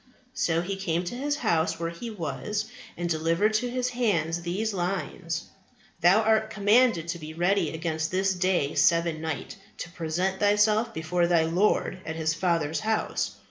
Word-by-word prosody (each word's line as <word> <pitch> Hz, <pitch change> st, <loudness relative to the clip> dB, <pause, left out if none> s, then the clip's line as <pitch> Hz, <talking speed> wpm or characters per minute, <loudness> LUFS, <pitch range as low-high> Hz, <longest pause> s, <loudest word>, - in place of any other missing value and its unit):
So 165 Hz, -8 st, +1 dB
he 195 Hz, +2 st, -3 dB
came 175 Hz, -3 st, -1 dB
to 180 Hz, -, -5 dB
his 290 Hz, +3 st, -1 dB
house 165 Hz, -, 0 dB
where 165 Hz, 0 st, -2 dB
he 170 Hz, +8 st, -7 dB
was, 210 Hz, +2 st, -3 dB, 0.3 s
and 175 Hz, 0 st, -2 dB
delivered 165 Hz, +6 st, +1 dB
to 245 Hz, +3 st, 0 dB
his 250 Hz, 0 st, -1 dB
hands 175 Hz, -10 st, 0 dB
these 200 Hz, +6 st, -2 dB
lines, 175 Hz, -2 st, -3 dB, 0.6 s
Thou 190 Hz, +6 st, +5 dB
art 220 Hz, 0 st, +2 dB
commanded 210 Hz, -4 st, +3 dB
to 170 Hz, 0 st, -3 dB
be 155 Hz, 0 st, -8 dB
ready 175 Hz, 0 st, +2 dB
against 160 Hz, -1 st, -2 dB
this 190 Hz, +1 st, +1 dB
day 180 Hz, -5 st, +1 dB
seven 165 Hz, -2 st, +2 dB
night, 160 Hz, -4 st, -4 dB, 0.2 s
to 170 Hz, -, -7 dB
present 180 Hz, +3 st, -2 dB
thyself 210 Hz, +2 st, +3 dB
before 170 Hz, +2 st, 0 dB
thy 170 Hz, -2 st, +3 dB
Lord 185 Hz, +3 st, +1 dB
at 160 Hz, -, -5 dB
His 160 Hz, 0 st, 0 dB
Father's 165 Hz, -2 st, 0 dB
house. 220 Hz, 0 st, -1 dB
175 Hz, 165 wpm, -27 LUFS, 165-210 Hz, 0.6 s, Thou